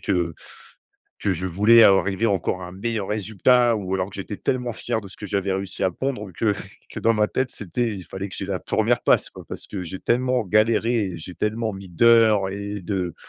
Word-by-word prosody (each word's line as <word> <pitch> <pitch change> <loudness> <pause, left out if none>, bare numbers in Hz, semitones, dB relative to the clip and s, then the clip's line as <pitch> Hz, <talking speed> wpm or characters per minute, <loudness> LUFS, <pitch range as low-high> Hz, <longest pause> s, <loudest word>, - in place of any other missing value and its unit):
que 85 -4 -1 0.9
que 100 - +1
je 90 +1 -3
voulais 105 +6 +6
av 100 -3 +7
arriver 100 +3 0
encore 95 -2 -1
à - - -6
un - - -10
meilleur 105 0 -3
résultat 110 +4 +3
ou 95 -3 -4
alors 95 0 -1
que 100 - -13
j’étais 100 +1 -6
tellement 125 -2 -1
fier 110 - -3
de 100 - -11
ce 95 - -13
que 105 - -7
j’avais 100 0 -1
réussi 95 0 -4
à 95 - +3
pondre 125 -2 -4
que 105 +4 +1 0.3
que - - -7
dans 115 - +3
ma 105 -1 +2
tête 130 +3 -1
c’était 115 +4 -2
il 95 -3 -8
fallait 95 +1 -6
que - - -8
j’aie 95 - -4
la 95 -3 -3
1re - - +1
place - - +3
quoi, - - -12
parce - - -6
que 100 -3 -5
j’ai 90 +2 -6
tellement 125 0 +1
galéré 110 +3 +2
et 85 - -7
j’ai 90 +3 -9
tellement 110 0 -1
mis 95 0 -9
d’heures 110 +1 +4
et 100 +1 -5
de, 90 -2 -3
100 Hz, 225 wpm, -23 LUFS, 95-115 Hz, 0.9 s, av